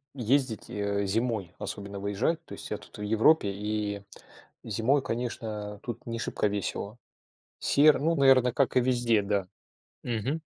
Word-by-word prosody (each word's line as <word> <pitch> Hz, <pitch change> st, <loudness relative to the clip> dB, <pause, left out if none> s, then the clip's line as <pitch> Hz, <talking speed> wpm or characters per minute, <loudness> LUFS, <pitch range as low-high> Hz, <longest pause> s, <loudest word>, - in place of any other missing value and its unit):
ездить, 130 Hz, -2 st, +1 dB
э, 100 Hz, 0 st, -1 dB
зимой, 110 Hz, -3 st, -1 dB
особенно 100 Hz, 0 st, -5 dB
выезжать. 100 Hz, +11 st, -1 dB
То -, -, -10 dB
есть -, -, -8 dB
я -, -, -1 dB
тут -, -, -14 dB
в -, -, -8 dB
Европе, 110 Hz, +3 st, +3 dB
и 105 Hz, 0 st, -3 dB, 0.6 s
зимой, 115 Hz, +6 st, +1 dB
конечно, 110 Hz, -4 st, -4 dB
тут 120 Hz, -, -6 dB
не 115 Hz, -1 st, -4 dB
шибко 105 Hz, -, 0 dB
весело. 100 Hz, +2 st, -3 dB, 0.6 s
Серо, 150 Hz, +1 st, +5 dB
ну, 165 Hz, +3 st, +1 dB
наверно, 135 Hz, -4 st, +5 dB
как 135 Hz, +1 st, +1 dB
и -, -, +7 dB
везде, 120 Hz, -3 st, +2 dB
да. 100 Hz, -2 st, -1 dB, 0.6 s
Мгм. 125 Hz, +7 st, -2 dB
110 Hz, 150 wpm, -28 LUFS, 100-130 Hz, 0.6 s, и